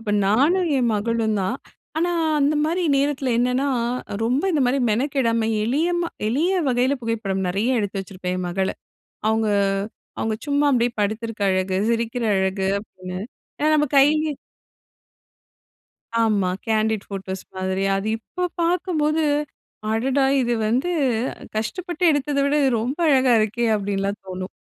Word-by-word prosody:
அப்போ 215 -2 -3
நானும் 315 - +3
என் 240 -2 +2
மகளும் 220 0 0
தான். 230 +8 -1 0.4
ஆனா 350 +1 +1 0.3
அந்த 290 +2 +3
மாரி 345 +3 0
நேரத்தில 275 -2 0
என்னான்னா, 250 +3 +1 0.6
ரொம்ப 255 +7 +1
இந்த 290 -4 +2
மாரி 260 +3 +2
மெனக்கெடாம, 230 -2 +1 0.2
எளிய 295 +9 +1
ம 340 - -2 0.2
எளிய 315 +11 +1 0.2
வகையில, 255 +3 +2
புகைப்படம் 205 -4 -2
நெறைய 225 +7 +1
எடுத்து 200 -1 -2
வச்சிருப்பேன் 185 -1 -5
என் 180 - -3
மகள்ல. 190 +2 -1 0.5
அவுங்க, 220 0 +1 0.7
அவுங்க 220 -1 -1
சும்மா 285 0 +2
அப்டியே 240 -1 +2
படுத்திருக்க 220 +1 -2
அழகு, 185 0 0
சிரிக்கிற 235 +1 -1
அழகு, 190 0 0
அப்டின்னு, 185 -3 -8 0.4
ஏன்னா 305 +1 +2
நம்ப 295 -2 +2
கையி 290 +3 +6 2.0
ஆமா. 210 -5 +2 0.2
கேண்டிட் 220 -1 +1
ஃபோட்டோஸ் 190 -1 -5
மாதிரி, 190 +1 -1
அது 195 +2 -2
இப்போ 360 +10 -5 0.2
பாக்கும்போது, 320 -3 +1 0.7
அடடா! 265 +5 +1 0.2
இது 240 -1 0
வந்து 255 +10 +1 0.7
கஷ்டப்பட்டு 350 - -4
எடுத்தத 290 -1 0
விட 285 - +1
இது 265 - +3
ரொம்ப 260 +8 -3
அழகா 260 -4 +4
இருக்கே! 225 +3 0
அப்படின்லாம் 200 0 -2
தோணும். 185 0 -5
230 Hz, 135 wpm, -22 LUFS, 200-280 Hz, 2.0 s, கையி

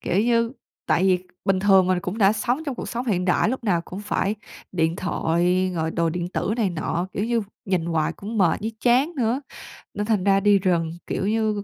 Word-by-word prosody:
Kiểu 185 - +1
như, 230 +1 +2 0.3
tại 170 - +2
vì 185 -1 +4 0.3
bình 195 -1 +2
thường 190 -2 +5
mình 185 -1 +1
cũng 180 +5 -4
đã 200 -1 +5
sống 245 +8 -1
trong 280 - -2
cuộc - - -6
sống 240 +2 -4
hiện 180 -5 +1
đại, 180 +3 +2
lúc 250 0 -3
nào 175 -5 +2
cũng 185 - -7
phải 205 0 -1 0.4
điện 165 -2 +1
thoại 180 +1 +1
rồi 160 -1 -1
đồ 165 0 0
điện 175 +1 -3
tử 195 - -2
này 215 -5 +1
nọ, 170 +2 -2
kiểu 205 - -1
như, 235 -1 0 0.2
nhìn 185 -4 0
hoài 165 -2 0
cũng 215 +3 -6
mệt 175 -5 +3
với 220 +2 -3
chán 255 +7 +3
nữa, 245 +1 +1 0.5
nên 205 +1 -2
thành 210 -4 +1
ra 195 0 +4
đi 205 0 +4
rừng, 170 -4 +1 0.2
kiểu 195 - -2
như, 215 -1 0
195 Hz, 220 wpm, -23 LUFS, 180-220 Hz, 0.5 s, thường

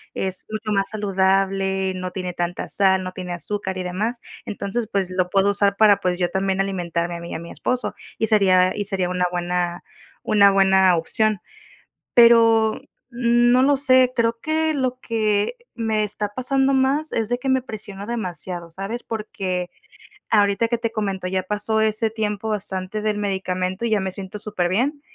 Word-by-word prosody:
Es 190 -1 -3
mucho 215 0 -4
más 195 0 0
saludable, 195 -2 0
no 185 0 -4
tiene 180 -1 -4
tanta 175 0 -3
sal, 190 -1 +3
no 185 - -5
tiene 180 -1 -6
azúcar 190 +1 -2
y 185 - -3
demás. 210 +7 -2 0.3
Entonces, 215 +2 -3
pues 190 -2 -1
lo 185 -1 0
puedo 195 +1 +3
usar 200 -1 +1
para, 205 -2 +5
pues 180 -2 -1
yo 175 -1 0
también 190 0 -1
alimentarme 175 -3 -2
a - - -8
mí 170 0 -8
y - - -4
a - - -4
mi 170 +1 -9
esposo, 250 0 -2 0.2
y 220 - +1
sería 185 -4 +4
y 205 - -3
sería 190 -3 -1
una 180 0 0
buena 175 0 -2 0.4
una 200 -2 +5
buena 190 -1 +4
opción. 215 +5 +1 0.8
Pero 230 -2 +5 0.3
no 240 +1 +3
lo 285 +1 +4
sé, 255 -2 +4
creo 230 0 +1
que 315 0 0
lo 255 -2 -1
que 215 - 0 0.2
me 220 -2 0
está 210 0 -2
pasando 270 +2 +1
más 275 +4 +1
es 225 -2 -1
de 245 +1 -1
que 265 - -4
me 260 -1 +2
presionó 205 -3 -8
demasiado, 180 -6 -4
¿sabes? 195 +7 -5
Porque 190 -5 -3 0.6
ahorita 205 +1 +3
que 235 - +1
te 230 -1 -2
comento, 195 -4 -2
ya 185 0 -1
pasó 210 +2 0
ese 220 +1 +1
tiempo 215 -1 -3
bastante 200 -1 -3
del 210 0 -1
medicamento 190 0 -2
y 235 - 0
ya 215 -2 +2
me 190 0 -2
siento 190 +2 -8
súper 195 -5 -2
bien, 265 - 0
200 Hz, 180 wpm, -22 LUFS, 185-225 Hz, 0.8 s, para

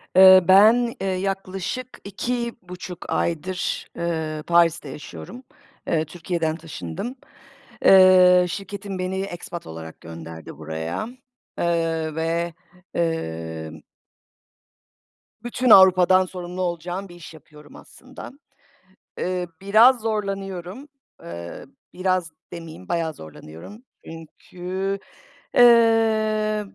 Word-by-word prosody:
Eee, 185 -1 +9
ben, 225 +5 +6
eee, 195 - -1
yaklaşık 195 +5 -4
2,5 200 -5 -5
aydır, 180 +2 -2
ııı, 160 -2 -3
Paris'te 170 -3 +2
yaşıyorum. 130 - -10 0.4
Eee, 160 -1 +1
Türkiye'den 165 -1 -3
taşındım. 165 - -7 0.7
Eee, 185 -1 +7
şirketim 195 +1 -6
beni 185 +1 -2
expat 175 -3 -7
olarak 80 0 -10
gönderdi 80 -2 -10
buraya, 80 - -5 0.5
ııı, 165 -2 -1
ve, 165 +1 -1 0.4
ımm 80 - -3 1.6
bütün 245 +1 -1
Avrupa'dan 185 -1 +7
sorumlu 180 0 -7
olacağım 175 +2 -4
bir 175 - -13
iş 170 -1 -12
yapıyorum 150 -1 -16
aslında. 260 +1 -12 0.9
Eee, 180 -1 -2
biraz 225 +6 +5
zorlanıyorum, 195 - -4 0.3
eee, 85 0 -8 0.3
biraz 185 -3 -1 0.2
demeyeyim 165 - -10
bayağı 165 -2 -1
zorlanıyorum, 80 - -12 0.2
çünkü, 180 +4 -6 0.6
eee, - - +6 1.0
b - - -19
175 Hz, 90 wpm, -23 LUFS, 160-195 Hz, 1.6 s, Eee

